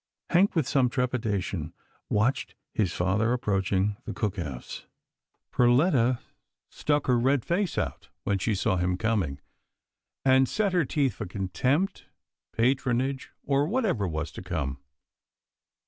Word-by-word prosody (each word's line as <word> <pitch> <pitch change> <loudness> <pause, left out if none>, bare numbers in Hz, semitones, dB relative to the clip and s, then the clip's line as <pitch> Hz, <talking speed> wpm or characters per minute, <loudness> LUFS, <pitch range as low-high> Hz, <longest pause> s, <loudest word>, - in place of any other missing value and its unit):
Hank, 185 +3 +4
with 155 -6 +2
some 135 -4 +3
trepidation, 105 -10 -2 0.3
watched 110 +6 +1 0.2
his 100 -6 +1
father 100 +8 +1
approaching 100 -3 0
the - - -5
cook 105 -2 -1
house. 70 -8 -6 0.6
Perletta 125 0 +4 0.5
stuck 145 -1 0
her 125 -2 +3
red 135 +1 +2
face 180 +1 0
out, - - -3
when 100 -1 0
she 110 +2 0
saw 95 -1 +1
him 90 0 0
coming, 95 -10 0 0.9
and 130 0 +5
set 205 -3 0
her 175 -4 +3
teeth 135 -2 +1
for - - -6
contempt, 125 - -1 0.4
patron 125 +1 +2
age, 135 0 -3
or 140 +1 +2
whatever 190 - 0
was 80 0 -3
to - - -8
come. 75 -7 -3
120 Hz, 130 wpm, -27 LUFS, 95-135 Hz, 0.9 s, and